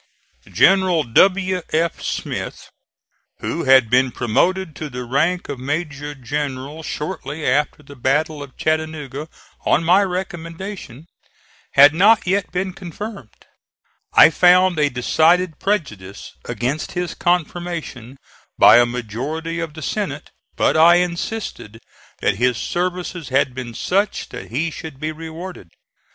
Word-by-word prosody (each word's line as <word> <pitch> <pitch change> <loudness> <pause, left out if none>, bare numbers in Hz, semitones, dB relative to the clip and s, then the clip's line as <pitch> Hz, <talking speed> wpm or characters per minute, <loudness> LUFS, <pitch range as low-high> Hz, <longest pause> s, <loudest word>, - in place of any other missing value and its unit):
General 190 -4 +4
W. 185 +8 +3
F. 165 +2 0
Smith, - - -5 0.7
who - - -3
had 130 -3 +6
been 125 +3 +3
promoted 165 +9 0
to 155 - -5
the 125 -1 -6
rank 155 +9 0
of 140 -3 -5
major 145 +1 -4
general 140 +2 -4
shortly 155 -1 -5
after 150 +3 0
the 140 0 -13
battle 145 +4 0
of 140 -2 -11
Chattanooga 155 -2 -3 0.3
on 155 - +2
my 180 +4 +5
recommendation, 175 - -6 0.7
had 145 +2 +8
not 205 +6 +4
yet 190 +1 0
been 185 +1 -2
confirmed. 185 - -9 0.7
I - - +8
found 180 0 +4
a 145 -1 +3
decided 160 +6 +2
prejudice 105 - -3
against 135 +6 -3
his 175 -1 -3
confirmation 170 -7 -2 0.4
by - - +8
a 120 - +4
majority 130 +9 -4
of 165 -2 -5
the 155 - -8
Senate, - - -4 0.2
but - - +2
I 165 +2 +7
insisted 175 - -3 0.4
that - - +1
his 125 0 +1
services 180 -2 -3
had 130 -1 +1
been 125 -2 -7
such 200 +3 -1
that - - -9
he 155 +8 -1
should 155 -3 -9
be 155 +1 -3
rewarded. 165 - -8
155 Hz, 130 wpm, -20 LUFS, 135-180 Hz, 0.7 s, had